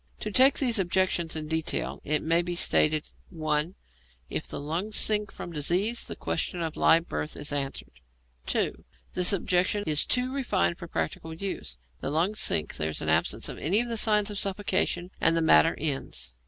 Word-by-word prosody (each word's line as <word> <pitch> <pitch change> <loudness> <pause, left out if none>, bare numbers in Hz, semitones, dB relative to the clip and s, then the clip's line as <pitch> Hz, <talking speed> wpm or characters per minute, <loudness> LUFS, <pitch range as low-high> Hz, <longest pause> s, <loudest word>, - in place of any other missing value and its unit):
To 215 - -3
take 260 +6 +5
these 245 -5 +2
objections 175 -2 0
in 155 -1 -3
detail, 160 0 -2
it 150 +1 +1
may 165 +2 +2
be 175 0 -4
stated: 155 -2 +3 0.3
(1) 155 0 -1 0.6
If - - -3
the - - -6
lungs 170 +9 -2
sink 210 -1 +2
from 175 - -8
disease, 180 +10 +1
the - - -6
question 175 +1 -2
of 165 -2 -3
live 165 +1 +3
birth 75 0 -4
is 145 0 -3
answered. 140 -1 -3 0.6
(2) - - -1 0.3
This 180 -1 +4
objection 190 +1 +1
is 150 -1 +3
too 250 +1 +1
refined 165 - 0
for - - -8
practical 85 - -4
use. 190 - -5 0.2
The - - -4
lungs 175 +8 0
sink, 75 -1 +1
there 80 0 -1
is 75 - -4
an - - -1
absence - - +1
of - - -7
any 185 +8 +2
of 240 0 -2
the 230 - -2
signs 210 -1 +3
of 205 - -2
suffocation, 190 -2 0
and 165 +1 +3
the - - +1
matter 75 - +5
ends. 140 - -3
170 Hz, 185 wpm, -27 LUFS, 150-205 Hz, 0.6 s, take